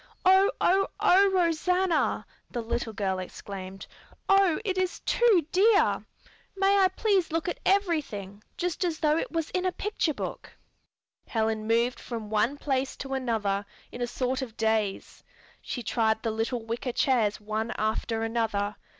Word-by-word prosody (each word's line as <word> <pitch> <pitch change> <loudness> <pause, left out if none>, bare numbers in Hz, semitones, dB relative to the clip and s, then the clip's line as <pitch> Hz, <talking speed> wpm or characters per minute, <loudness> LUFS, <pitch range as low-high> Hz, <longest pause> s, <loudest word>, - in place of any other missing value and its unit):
"Oh, 380 +2 +6
oh, 390 +2 +3
oh, 390 +2 +5
Rosanna!" 360 -1 +1 0.2
the 240 -2 -4
little 230 0 -2
girl 195 -3 -2
exclaimed. 190 +1 -8 0.4
"Oh, 390 -4 +4
it 380 -3 0
is 370 -1 -1
too 435 -10 +3
dear! 410 +2 +4 0.5
May 395 +1 +4
I 380 - +6
please 380 -2 +1
look 330 +1 -1
at 350 - -3
everything, 295 - 0 0.2
just 355 0 -2
as 340 -3 -1
though 305 -1 +2
it - - -2
was 330 -1 -2
in 365 - -1
a 370 - +1
picture 360 -6 -1
book?" - - -6 0.7
Helen 220 -1 -1
moved 235 +2 +1
from 225 -3 -6
one 225 +6 +1
place 270 -2 -1
to 270 0 -5
another 220 -6 -1 0.3
in 245 - -8
a 245 - 0
sort 255 +2 -2
of 240 -4 -7
daze. 220 -3 -1 0.4
She 245 - -5
tried 220 -1 +1
the 225 - 0
little 225 +1 -2
wicker 235 +2 -3
chairs 230 -7 +2
one 215 +2 -3
after 225 +1 -1
another. 220 -3 -1
255 Hz, 155 wpm, -27 LUFS, 220-360 Hz, 0.7 s, Oh